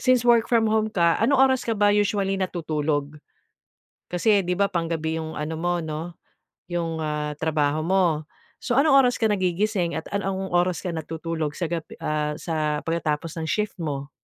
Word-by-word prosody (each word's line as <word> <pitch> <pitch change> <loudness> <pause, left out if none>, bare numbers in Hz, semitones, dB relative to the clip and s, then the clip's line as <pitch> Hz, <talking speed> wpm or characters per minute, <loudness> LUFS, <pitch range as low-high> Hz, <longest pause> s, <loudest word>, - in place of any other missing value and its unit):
since 255 -2 +3
work 235 -1 +4
from 230 -3 +3
home 220 0 +2
ka, 170 -4 +2
anong 270 +5 +3 0.2
oras 260 - 0
ka 225 -2 -1
ba 205 0 +4
usually 200 -1 +1
natutulog? 150 -4 -2 0.9
Kasi, 200 +1 +3
'di 180 - -1
ba, 200 - +4
panggabi 165 -2 -2
yung 160 0 -4
ano 155 +2 -4
mo, 175 +1 0
'no? 160 +2 -5 0.6
Yung, 170 -2 -2
ah 150 -1 -2
trabaho 155 -1 +1
mo, 190 +1 +3 0.6
so, 245 - -1
anong 275 0 +6
oras 245 - +2
ka 220 -2 +1
nagigising 185 -2 0
at 160 - -4
ano 200 -1 -1
ong 190 0 -4
oras 175 0 +1
ka 180 - -2
natutulog 160 -1 -4
sa 170 -3 -2
gabi 165 -2 -4
ah, 150 0 -1
sa 155 -2 -2
pagkatapos 165 0 -2
ng 160 - -3
shift 210 +5 -1
mo? 140 -3 -4
170 Hz, 175 wpm, -24 LUFS, 155-205 Hz, 0.9 s, anong